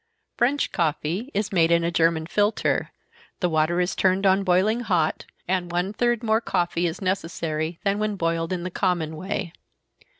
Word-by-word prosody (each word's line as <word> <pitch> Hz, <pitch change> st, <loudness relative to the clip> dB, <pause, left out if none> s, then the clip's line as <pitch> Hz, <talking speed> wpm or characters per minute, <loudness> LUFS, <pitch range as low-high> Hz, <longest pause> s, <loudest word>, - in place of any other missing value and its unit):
French 270 Hz, +5 st, +1 dB
coffee 170 Hz, -, -1 dB
is 210 Hz, +1 st, -1 dB
made 165 Hz, -4 st, +3 dB
in 170 Hz, 0 st, +3 dB
a 170 Hz, -, 0 dB
German 165 Hz, -1 st, +2 dB
filter, 205 Hz, +5 st, +1 dB, 0.5 s
the 180 Hz, -, +1 dB
water 160 Hz, +1 st, +1 dB
is 180 Hz, +1 st, 0 dB
turned 190 Hz, +1 st, +2 dB
on 195 Hz, +1 st, +4 dB
boiling 195 Hz, +5 st, +2 dB
hot, 180 Hz, -9 st, 0 dB, 0.2 s
and 180 Hz, -1 st, -1 dB
one 180 Hz, +3 st, -1 dB
third 240 Hz, +1 st, 0 dB
more 220 Hz, 0 st, +2 dB
coffee 175 Hz, -4 st, 0 dB
is 170 Hz, +4 st, -5 dB
necessary 165 Hz, -3 st, -2 dB
than 200 Hz, 0 st, +1 dB
when 215 Hz, -1 st, -1 dB
boiled 165 Hz, -2 st, -1 dB
in 180 Hz, -2 st, -2 dB
the 180 Hz, -, -4 dB
common 175 Hz, -4 st, -1 dB
way. 170 Hz, 0 st, -4 dB
180 Hz, 170 wpm, -24 LUFS, 165-200 Hz, 0.5 s, on